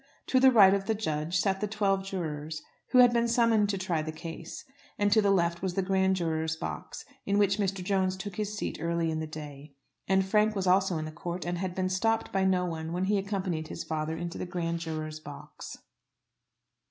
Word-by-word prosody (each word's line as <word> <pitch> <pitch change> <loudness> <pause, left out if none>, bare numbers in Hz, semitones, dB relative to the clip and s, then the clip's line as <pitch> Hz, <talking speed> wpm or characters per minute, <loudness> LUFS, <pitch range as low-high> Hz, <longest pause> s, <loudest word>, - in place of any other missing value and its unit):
To 260 - +4
the 265 0 +7
right 200 -5 +7
of 195 -1 -1
the 220 - +1
judge 160 -4 -1
sat 190 +1 +1
the 210 - 0
twelve 200 -2 0
jurors 155 -5 -4 0.3
who - - +3
had 245 -1 +7
been 235 0 +2
summoned 230 -3 +3
to 200 - 0
try 180 -4 -1
the 155 +1 -4
case, 165 +1 -8 0.3
and 205 -1 +2
to 220 +1 +5
the 200 - +2
left 170 -3 +2
was 185 -2 -2
the 195 - +1
grand 190 0 +2
jurors' 160 -2 -1
box, - - -6 0.2
in 200 0 +2
which 200 0 +3
Mr. 195 -2 -1
Jones 190 -1 0
took 195 -1 -7
his 210 0 -3
seat - - -4
early 170 0 0
in 155 - -2
the 160 - -3
day. 150 -2 -9 0.3
And 190 0 +3
Frank 210 +2 +2
was 195 -2 -1
also 185 -1 +3
in 155 - -3
the 155 - -6
court, 170 +2 -5
and 175 0 -2
had 185 -1 -3
been 185 -1 0
stopped 225 +5 0
by 195 0 +2
no 185 -1 +2
one 165 -1 -4
when 180 +1 -1
he 200 +1 +2
accompanied 190 -5 -3
his 165 - -6
father 160 0 -3
into 170 +1 -5
the - - -4
grand 170 -2 -2
jurors' 155 -1 -5
box. 145 -2 -10
185 Hz, 220 wpm, -29 LUFS, 160-200 Hz, 0.3 s, the